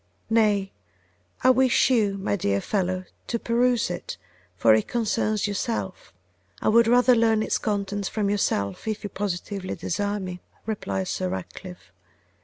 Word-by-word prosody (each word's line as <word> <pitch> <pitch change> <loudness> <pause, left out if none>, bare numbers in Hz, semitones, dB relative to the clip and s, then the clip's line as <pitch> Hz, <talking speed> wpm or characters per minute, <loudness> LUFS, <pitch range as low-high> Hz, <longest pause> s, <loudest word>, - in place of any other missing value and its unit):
'Nay, 210 -3 +3 0.7
I 255 - +7
wish 260 0 +3
you, 210 -5 +2
my 195 +1 -1
dear 100 - 0
friend, 185 - -1 0.2
to 235 - -1
peruse 235 -2 +1
it, 175 - -6 0.4
for 110 +3 +5
it 110 - +2
concerns 215 -2 0
yourself.' 200 - -3 0.5
'I - - +1
would 230 +1 +5
rather 245 +1 +5
learn 225 -1 +3
its - - 0
contents 205 -1 -2
from 210 -2 -1
yourself, 100 - -1
if 215 -1 -3
you 205 - -5
positively 195 0 -3
desire 205 +3 -2
me,' 180 -2 -6 0.2
replied 100 - -3
Sir 90 - -2
Ratcliffe. 95 - -8
205 Hz, 145 wpm, -25 LUFS, 185-225 Hz, 0.7 s, I